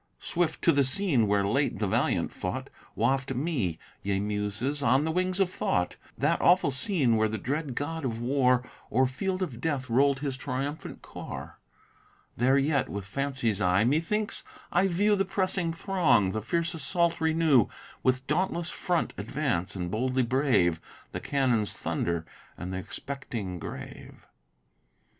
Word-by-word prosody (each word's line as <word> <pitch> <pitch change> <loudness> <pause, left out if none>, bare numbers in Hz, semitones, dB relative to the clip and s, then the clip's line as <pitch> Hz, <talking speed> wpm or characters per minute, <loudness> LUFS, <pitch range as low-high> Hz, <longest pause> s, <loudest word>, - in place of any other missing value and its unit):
Swift, 170 -2 -1
to - - +6
the 140 0 +3
scene 135 - +2
where 100 -1 +2
late 135 +8 +1
the 105 - 0
valiant 95 - +1
fought, - - -4 0.2
Waft 135 +4 +1
me, 125 - -1 0.2
ye 100 -1 0
muses, 105 +7 -2
on 140 +1 +3
the 160 - 0
wings 185 +2 0
of 195 - +4
thought 90 - -1 0.2
That 150 +7 +1
awful 175 -5 +5
scene 130 - +3
where 110 0 +3
the 110 +1 -3
dread 140 +4 -3
god 160 +4 -3
of 115 -4 -2
war 125 0 +2 0.2
O'er 130 +3 +4
field 185 +9 -2
of 125 -10 -5
death 140 -6 -2
roll'd 135 +2 +3
his 135 -3 -2
triumphant 135 +3 -4
car: - - -8 0.8
There 130 +3 +3
yet, 140 -1 +1
with 100 -1 -5
fancy's 130 -3 -1
eye, 90 +2 +3
methinks 165 - 0 0.3
I 185 +3 +3
view 205 +4 +3
The 195 - +2
pressing 190 -3 0
throng, 165 - +2
the 110 - -2
fierce 170 - -1
assault 170 +2 0
renew: 160 -7 +4 0.3
With 130 +1 +1
dauntless 175 0 0
front 175 -2 -1
advance, 100 - -1
and 90 -2 -3
boldly 130 +3 +1
brave 115 - +2 0.3
The - - -4
cannon's 125 -7 +1
thunder 85 -1 -2 0.3
and 90 +1 -5
th' - - -2
expecting 105 -2 -5
grave. - - -9
135 Hz, 150 wpm, -28 LUFS, 110-165 Hz, 0.8 s, to